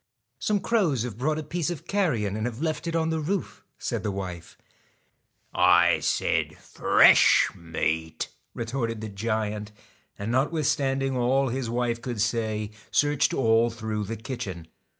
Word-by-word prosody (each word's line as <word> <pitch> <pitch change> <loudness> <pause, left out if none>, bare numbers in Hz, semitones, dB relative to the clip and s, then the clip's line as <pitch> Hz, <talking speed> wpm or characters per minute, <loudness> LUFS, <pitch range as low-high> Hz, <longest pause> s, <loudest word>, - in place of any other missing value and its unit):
I 115 -1 -56
Some 205 +7 0
crows 170 - +1
have 120 -4 -5
brought 150 +6 0
a 155 - -3
piece 170 +1 -2
of 175 -5 -6
carrion 125 - 0
and 110 +2 -1
have 120 -1 -6
left 155 +1 -2
it 165 - -2
on 160 0 +1
the 160 - 0
roof,' 180 +5 -3
said - - -3
the - - -2
wife. 90 -4 -6 1.0
I 85 -1 +5
1 - - -11
said - - 0
fresh - - +5
meat, 80 -1 -2
' - - -43
retorted 115 -1 -3
the 110 - -5
giant; 105 0 -2 0.5
and 100 +3 -3
not 130 +5 +2
withstanding 135 -4 0
all 130 +2 +2
his 125 -1 -3
wife 120 0 -1
could 120 -2 -4
say, 110 -1 -1 0.2
searched 145 -1 +2
all 115 -2 +3
through 110 -2 -4
the 115 +3 -5
kitchen. 95 -8 -6
115 Hz, 165 wpm, -26 LUFS, 105-140 Hz, 1.0 s, I